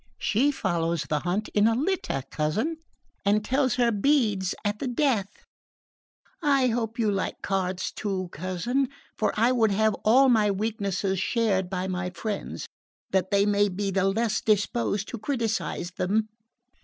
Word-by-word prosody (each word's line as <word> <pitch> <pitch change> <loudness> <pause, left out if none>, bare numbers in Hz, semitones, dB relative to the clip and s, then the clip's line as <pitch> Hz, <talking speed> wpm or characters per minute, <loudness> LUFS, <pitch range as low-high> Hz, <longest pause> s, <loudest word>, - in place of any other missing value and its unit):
She 255 +7 +2
follows 170 - -1
the 150 - -1
hunt 180 +6 -1
in 210 +1 +3
a 225 - +3
litter, 285 - -1
cousin, 215 - -1 0.5
and 210 +1 +2
tells 260 -1 +1
her 240 -2 +3
beads 210 -5 +1
at 205 0 -1
the 275 - -2
death! 240 -6 -1 1.0
I 275 -4 +3
hope 225 0 -2
you 220 -3 +2
like 195 -1 -3
cards 185 -1 -1
too, 190 -3 -3
cousin, 185 - -1 0.3
for 215 - +1
I 235 +3 +4
would 230 -4 +3
have 215 +2 +2
all 260 +5 +6
my 220 -4 +4
weaknesses 200 -2 -1
shared 195 -3 +1
by 185 0 -2
my 180 -1 -2
friends, 200 +3 -5 0.5
that 190 -1 +1
they 200 0 +3
may 205 0 +3
be 195 +1 -2
the 195 0 +1
less 220 +1 0
disposed 210 -1 +1
to 235 - -6
criticise 225 -7 -2
them." 210 +5 0
210 Hz, 155 wpm, -26 LUFS, 190-235 Hz, 1.0 s, all